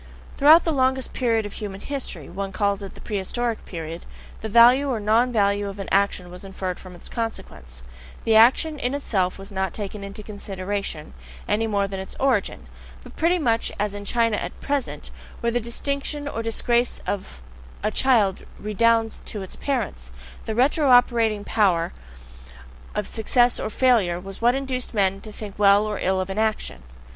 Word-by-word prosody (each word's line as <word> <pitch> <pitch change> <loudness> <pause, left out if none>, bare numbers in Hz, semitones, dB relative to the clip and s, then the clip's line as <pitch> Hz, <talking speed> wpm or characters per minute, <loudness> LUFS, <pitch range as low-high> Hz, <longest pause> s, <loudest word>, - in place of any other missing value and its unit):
Throughout 305 +4 +7
the 330 - 0
longest 260 -2 +1
period 230 -3 +1
of 205 - -7
human 200 -2 -6
history 250 - -5
one 195 +2 -5
calls 200 0 0
it 195 - -8
the - - -12
prehistoric 225 +3 -2
period 165 -1 -6 0.4
the 220 - -4
value 245 +5 +6
or 240 -4 0
non 225 +4 +3
value 200 -2 +1
of 195 - -8
an 195 - -5
action 195 -2 +1
was 180 +2 -10
inferred 190 -2 -5
from 185 -1 -11
its 175 - -12
CONSEQUENCES; 65 - -6 0.4
the 225 - +3
action 265 +7 +5
in 250 +3 -1
itself 190 -10 -1
was 195 +1 -10
not 190 -2 -2
taken 205 -1 -5
into 200 +1 -8
consideration, 200 -5 -5 0.3
any 220 +2 +1
more 200 -2 +1
than 195 -1 -5
its 190 - -7
origin; 260 -7 0 0.4
but - - -13
pretty 340 +3 +2
much 230 -8 0
as 205 0 -1
in 205 0 -6
China 230 +1 +1
at - - -5
present, 280 -3 -3 0.3
where 235 - 0
the 245 - +1
distinction 280 +5 -3
or 230 -5 -3
disgrace 235 +1 0
of 190 - -5 0.4
a 215 - +1
child 220 -7 +2 0.2
redounds 225 +2 +1
to 205 -3 -5
its 190 - -10
parents, 215 - -3 0.3
the 220 - -3
retro 275 +4 +3
operating 230 -4 +4
power 185 -6 +1 1.0
of 210 - -1
success 240 +2 +2
or - - -2
failure 220 -8 +2
was 195 +3 -9
what 240 +2 +4
induced 260 -3 -3
men 195 -1 +1
to 215 - -10
think 210 -1 -8
well 200 +1 +6
or 210 -1 -3
ill 190 0 +1
of 185 +1 -3
an 195 - -2
action. 215 - -1
215 Hz, 175 wpm, -24 LUFS, 195-240 Hz, 1.0 s, Throughout